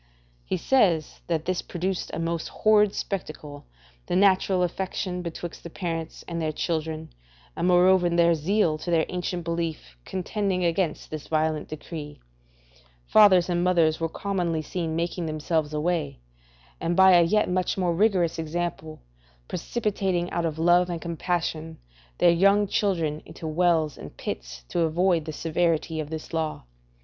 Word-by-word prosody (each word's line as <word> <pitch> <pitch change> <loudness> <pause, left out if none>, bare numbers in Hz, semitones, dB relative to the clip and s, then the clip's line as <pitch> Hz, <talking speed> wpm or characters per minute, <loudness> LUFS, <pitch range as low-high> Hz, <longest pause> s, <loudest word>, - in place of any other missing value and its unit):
He - - -2
says 180 - +2
that 160 -2 -1
this 185 0 -1
produced 185 +1 -3
a - - -4
most 165 0 -2
horrid 210 -2 +3
spectacle 155 -6 -5 0.4
the - - -1
natural 190 -1 +3
affection 180 0 -3
betwixt 170 0 -6
the 170 - -8
parents 165 -2 -5
and 170 -1 -3
their 155 -1 0
children, 160 0 -3 0.4
and 175 - 0
moreover 180 0 +5
their 170 0 +4
zeal 165 0 +1
to 175 - -6
their 165 -2 +3
ancient 180 -1 -3
belief, 165 - -4
contending 190 - -2
against 170 -1 -1
this 155 -1 -6
violent 155 -1 0
decree, 150 -1 -8 0.9
fathers 190 - +6
and 175 -1 0
mothers 165 -3 +3
were 165 0 -1
commonly 175 -4 -2
seen 165 0 -3
making 170 0 -2
themselves 155 0 -1
away, 155 -1 -1 0.6
and 170 +1 -1
by 190 0 +7
a 175 -1 +7
yet 210 +6 +2
much 185 +1 0
more 180 -2 +1
rigorous 180 -4 +2
example, 160 -1 -4 0.4
precipitating 190 -3 -2
out 170 -1 0
of 155 -1 -4
love 175 +2 +4
and 170 -1 -3
compassion 165 -1 -3 0.4
their 175 - +5
young 200 +4 +4
children 170 -7 0
into - - -10
wells 160 -2 +1
and 75 -6 -10
pits, - - -6
to - - -1
avoid 170 0 +2
the 160 - -4
severity 160 0 0
of 150 -1 -4
this 160 +1 -7
law. 160 -1 -2
170 Hz, 150 wpm, -26 LUFS, 160-180 Hz, 0.9 s, by